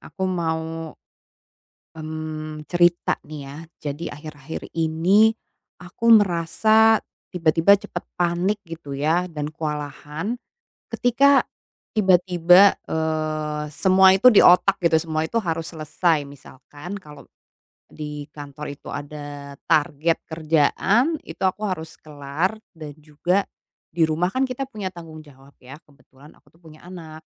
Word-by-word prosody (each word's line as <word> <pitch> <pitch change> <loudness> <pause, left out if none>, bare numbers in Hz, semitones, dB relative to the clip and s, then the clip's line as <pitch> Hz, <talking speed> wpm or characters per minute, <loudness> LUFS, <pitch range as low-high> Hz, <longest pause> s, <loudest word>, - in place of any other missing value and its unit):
aku 190 - -6
mau, 165 -3 -3 1.0
mmm, 155 -1 -7
cerita 175 0 +2
nih 150 0 -9
ya. 140 +1 -9 0.3
Jadi 145 +4 -8
akhir-akhir 150 0 -8
ini 170 +7 +3 0.5
aku 180 +6 0
merasa 215 +3 +4 0.3
tiba-tiba 170 +2 +4
cepat 175 - -7 0.2
panik 175 +4 0
gitu 165 -3 -9
ya 165 +5 0
dan 150 -2 -4
kewalahan, 150 - -5 0.6
ketika 275 +3 +4 0.5
tiba-tiba, 180 -1 +5
eee, 155 -1 -2
semua 190 +1 +5
itu 210 +7 +6
di 215 - +5
otak 185 +2 +5
gitu 170 -2 +1
semua 160 -1 -2
itu 230 +7 -1
harus 165 -3 -3
selesai. 155 0 0
Misalkan 145 +5 -11
kalau 150 -1 -14 0.7
di 150 -1 -7
kantor 145 0 -9
itu 140 - -13
ada 145 -1 -8
target 160 0 +2
kerjaan 165 - +1
itu - - -8
aku 190 +3 0
harus 160 -4 -5
kelar, 150 +6 -3 0.2
dan 155 -5 -10
juga 165 +6 -1 0.5
di 160 0 +2
rumah 170 +4 0
kan 260 +3 0
kita 255 +2 -4
punya 210 -6 -5
tanggung 165 -2 -11
jawab 140 -2 -18
ya. 130 +2 -12
Kebetulan 145 0 -20
aku - - -39
tuh 165 - -26
punya 155 -1 -16
anak. 160 -3 -10
160 Hz, 125 wpm, -22 LUFS, 150-185 Hz, 1.0 s, itu